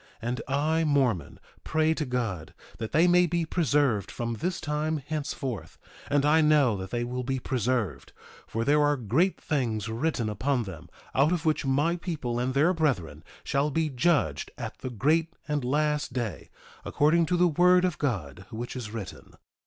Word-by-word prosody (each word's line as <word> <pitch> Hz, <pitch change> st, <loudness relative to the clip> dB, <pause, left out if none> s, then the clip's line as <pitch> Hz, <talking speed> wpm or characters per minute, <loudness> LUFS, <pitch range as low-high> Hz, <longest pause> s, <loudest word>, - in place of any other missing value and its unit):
And 120 Hz, +1 st, -3 dB
I, 155 Hz, +4 st, +1 dB
Mormon, 135 Hz, -, +1 dB, 0.2 s
pray 160 Hz, 0 st, +2 dB
to 155 Hz, -1 st, -2 dB
God 115 Hz, -, -3 dB, 0.2 s
that 110 Hz, -1 st, -4 dB
they 165 Hz, +3 st, +4 dB
may 180 Hz, 0 st, +5 dB
be 170 Hz, 0 st, 0 dB
preserved 145 Hz, -, +1 dB
from 120 Hz, 0 st, -3 dB
this 175 Hz, -, -2 dB
time 155 Hz, +1 st, -1 dB
henceforth. 140 Hz, -5 st, -5 dB, 0.3 s
And 145 Hz, 0 st, +2 dB
I 155 Hz, +2 st, +5 dB
know 150 Hz, -7 st, +4 dB
that 95 Hz, 0 st, -6 dB
they 120 Hz, +2 st, -2 dB
will 125 Hz, +1 st, -3 dB
be 130 Hz, +1 st, -2 dB
preserved; 120 Hz, -, -2 dB, 0.4 s
for 115 Hz, +1 st, -2 dB
there 150 Hz, +1 st, +4 dB
are 145 Hz, 0 st, +3 dB
great 135 Hz, -, +1 dB
things 115 Hz, -7 st, -1 dB
written 120 Hz, 0 st, -1 dB
upon 120 Hz, +5 st, 0 dB
them, 85 Hz, -4 st, -9 dB, 0.2 s
out 140 Hz, +5 st, +3 dB
of 175 Hz, -2 st, -1 dB
which 155 Hz, -3 st, +1 dB
my 145 Hz, +6 st, +2 dB
people 140 Hz, -9 st, -3 dB
and 130 Hz, +2 st, -1 dB
their 155 Hz, +6 st, +4 dB
brethren 140 Hz, -, -1 dB, 0.2 s
shall 140 Hz, +2 st, +1 dB
be 155 Hz, +2 st, 0 dB
judged 130 Hz, -, +1 dB
at -, -, -6 dB
the 130 Hz, -, -5 dB
great 155 Hz, +8 st, +1 dB
and 150 Hz, -2 st, -1 dB
last 150 Hz, +1 st, 0 dB
day, 120 Hz, -6 st, -4 dB, 0.3 s
according 160 Hz, +3 st, +2 dB
to 180 Hz, -, +1 dB
the 180 Hz, 0 st, +5 dB
word 180 Hz, +3 st, +4 dB
of 180 Hz, -4 st, -2 dB
God 95 Hz, -, -3 dB
which 120 Hz, +3 st, -6 dB
is 120 Hz, -4 st, -5 dB
written. 110 Hz, -4 st, -8 dB
140 Hz, 175 wpm, -27 LUFS, 120-155 Hz, 0.4 s, may